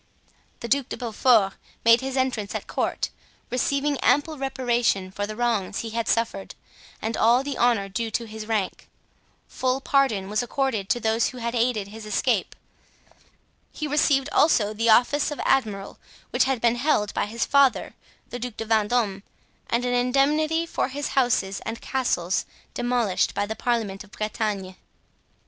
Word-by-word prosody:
The 235 - -4
Duc 275 +1 +1
de - - -5
Beaufort 225 -4 +3 0.3
made 230 +1 +6
his 265 0 -3
entrance 245 -6 -1
at - - -4
court, - - -2 0.4
receiving 280 +3 0
ample 300 +2 +2
reparation 240 -8 0
for 205 +1 -3
the 215 - -6
wrongs 225 -5 -1
he 225 - -6
had 230 0 -2
suffered, 225 -4 -1 0.5
and 220 0 -1
all 235 +4 +4
the 280 -1 -4
honor 235 -5 +2
due 225 +4 -3
to 230 +2 -2
his 220 -1 -8
rank. 215 -5 -2 0.6
Full 255 0 -1
pardon 265 -9 +1
was 210 +2 0
accorded 245 -5 -1
to 240 - +2
those 225 0 +1
who 255 - -7
had 235 -1 -3
aided 235 -3 +1
in 200 - -14
his 220 -1 -9
escape. 210 - 0 1.2
He 305 - -5
received 285 -2 +2
also 220 -9 +3
the 230 +2 0
office 250 +6 +4
of 295 - -6
admiral, 210 -7 0 0.3
which - - +3
had 265 -2 0
been 235 0 +3
held 240 -6 +1
by - - -1
his 230 +2 -2
father, 280 -2 +3 0.4
the 245 - -5
Duc 245 -2 -6
de 225 - -4
Vendome 215 -2 +1 0.5
and 235 +1 0
an 245 - 0
indemnity 290 +6 +2
for 335 - -1
his 280 +2 -4
houses 240 -7 +1
and 225 +1 -5
castles, 190 -9 -1 0.3
demolished 240 -5 0
by 205 - 0
the 220 +2 -5
Parliament 220 -6 -1
of 210 - -18
Bretagne. 210 -3 -3
235 Hz, 165 wpm, -25 LUFS, 215-265 Hz, 1.2 s, made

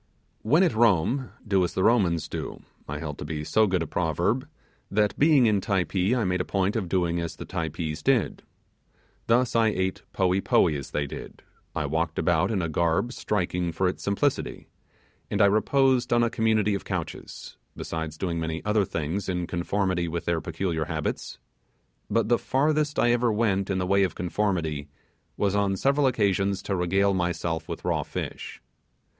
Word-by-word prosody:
When 155 - +4
at 175 - +2
Rome 115 - +2 0.2
do 95 -2 +3
as 90 - -2
the 95 - +1
Romans 95 -9 +3
do, - - -6 0.3
I 75 - -3
held 75 -2 -6
to - - -4
be 75 -1 -4
so 110 +7 +3
good 90 -3 +1
a - - -4
proverb, 85 - -1 0.4
that 105 +1 +1
being 145 -4 +5
in 105 -3 +3
Typee 95 +2 +1
I 120 - +1
made 90 0 0
a - - 0
point 95 +1 0
of 100 -6 -2
doing 85 -2 +1
as 85 -1 -4
the - - -8
Typees 80 -1 -4
did. 125 -2 +1 0.9
Thus 120 +1 +2
I 115 -1 +4
ate 95 -3 -1
poee 95 0 +1
poee 80 -5 +3
as 70 -2 -5
they 75 - -1
did; 70 - -9 0.3
I 80 - -1
walked 80 +2 -1
about 85 -3 +2
in 100 -5 0
a - - 0
garb 85 - 0
striking 90 -6 -1
for 90 +3 0
its 90 - -3
simplicity; 115 +8 -1 0.6
and - - -1
I - - +7
reposed 130 +5 +3
on 120 0 +4
a 115 - +1
community 110 -3 +2
of 100 - -3
couches; - - -6 0.2
besides 80 -1 -5
doing 85 -2 -2
many 80 0 -4
other 105 -1 +2
things 85 +5 -3
in 90 -1 -1
conformity 90 0 -1
with 85 +1 -4
their 85 -2 0
peculiar 80 -1 -2
habits; - - -4 0.7
but 115 +1 +1
the 120 +1 +3
farthest 150 +2 +1
I 120 - +4
ever 120 -1 +2
went 105 -3 +1
in 95 - 0
the 90 - 0
way 100 +2 +3
of 95 -3 +1
conformity, 85 -6 -1 0.5
was 100 -2 +1
on 100 -1 +1
several 140 +5 +2
occasions 100 -5 +1
to 100 - -1
regale 95 +3 +2
myself 85 -2 -2
with - - -6
raw - - +1
fish. - - -6
95 Hz, 180 wpm, -26 LUFS, 85-110 Hz, 0.9 s, I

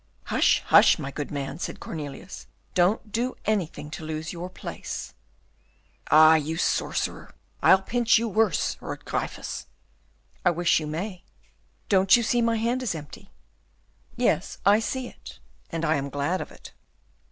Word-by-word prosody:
"Hush, - - +2
hush, - - +6
my 140 - -5
good 145 +1 -5
man," 140 +2 -4
said - - -5
Cornelius, 155 +3 -7 0.3
"don't 200 +4 +2
do 245 +4 -1
anything 180 -8 -2
to 160 - -7
lose 155 +1 -4
your 175 +1 -6
place." 185 - -7 1.0
"Ah, 155 +1 +8
you 160 +1 0
sorcerer! - - -1 0.3
I'll 190 0 +6
pinch 235 +2 +3
you 230 +1 0
worse," 215 -5 +1
roared - - -7
Gryphus. - - -4 0.8
"I - - +5
wish 175 0 +2
you 155 - -5
may." 180 +4 -5 0.6
"Don't 190 +1 +5
you 235 - 0
see 240 +2 +2
my 230 -1 +2
hand 235 +3 0
is 225 -9 -2
empty?" 155 +6 -10 0.9
"Yes, - - 0
I 205 +2 +6
see 255 +3 -3
it, - - -12 0.3
and 165 0 -2
I 155 -1 +2
am 140 0 -3
glad 145 +6 -1
of - - -7
it." - - -13
180 Hz, 150 wpm, -26 LUFS, 155-220 Hz, 1.0 s, Ah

